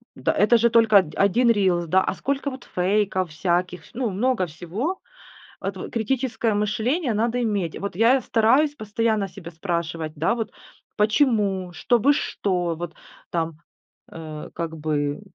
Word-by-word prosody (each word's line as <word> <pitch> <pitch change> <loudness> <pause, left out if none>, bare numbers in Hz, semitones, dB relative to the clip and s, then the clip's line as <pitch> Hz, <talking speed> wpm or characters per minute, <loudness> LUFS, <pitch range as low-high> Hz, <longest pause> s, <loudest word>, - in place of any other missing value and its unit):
да, - - 0
это 215 +4 +4
же 235 +1 +3
только 225 -2 +4
од 155 -5 -4
один 230 +5 +3
рилс, 185 -5 +2
да. 190 +4 +4
А - - -1
сколько 280 +7 -2
вот 260 -1 -9
фейков 185 0 +1
всяких, 175 +1 -1
вс - - -18
ну, 245 -1 -1
много 210 +1 +1
всего. 185 - -4 0.6
Вот - - -5
критическое 235 -1 0
мышление 225 - 0
надо 230 +3 0
иметь. 200 -8 -1
Вот 200 -3 -4
я 235 +6 +4
стараюсь 260 +7 +3
постоянно 215 -2 -1
себя 175 -2 -10
спрашивать, 165 -2 -3
да 160 +9 +1
вот: 225 -3 -3 0.5
"Почему? 210 -5 +2
Чтобы 240 - +3
что?" 180 - -1
Вот 170 0 -6 0.4
там, 165 -2 -2 0.5
э, 155 -2 -8
как 165 -1 -4
бы 150 0 -1
205 Hz, 150 wpm, -23 LUFS, 175-235 Hz, 0.6 s, это